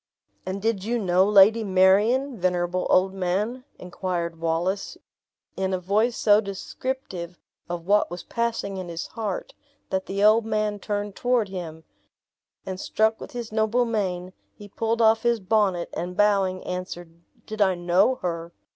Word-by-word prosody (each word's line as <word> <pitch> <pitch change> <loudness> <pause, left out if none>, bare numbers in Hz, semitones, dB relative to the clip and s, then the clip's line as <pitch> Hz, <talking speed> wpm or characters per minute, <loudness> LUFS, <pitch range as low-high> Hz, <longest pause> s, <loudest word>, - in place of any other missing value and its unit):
"And 190 +1 -4
did 220 -4 0
you 235 +3 -1
know 185 -4 +3
Lady 210 +2 +6
Marion, 205 +8 +3
venerable 180 -1 0
old 190 +1 +3
man?" 200 +7 -2
inquired 175 -2 -4
Wallace, 170 +4 -1 0.6
in 190 0 -1
a - - -3
voice 210 +6 +1
so 210 0 +5
descriptive 195 -3 -5 0.3
of 170 -1 -4
what 205 +2 +3
was 175 0 -7
passing 230 -4 -2
in 185 -2 -6
his 170 0 -4
heart, 210 -5 -5 0.4
that 190 0 -1
the 200 +1 -1
old 215 +2 +6
man 215 -1 -1
turned 205 -1 -3
toward 245 -4 +1
him; 165 -4 -7 0.8
and 190 -1 -5
struck 220 +2 +1
with - - -9
his 240 -2 -6
noble 220 +3 +1
mien, 185 -5 -2 0.2
he 205 - -12
pulled 225 +3 -1
off 220 0 +5
his 235 -1 +1
bonnet, 195 -3 +1
and 180 +2 -5
bowing, 195 -3 +2
answered, 175 -2 -6 0.2
"Did 215 0 -5
I 190 -2 +4
know 180 +8 +2
her? 170 -1 -3
195 Hz, 155 wpm, -25 LUFS, 180-220 Hz, 0.8 s, Lady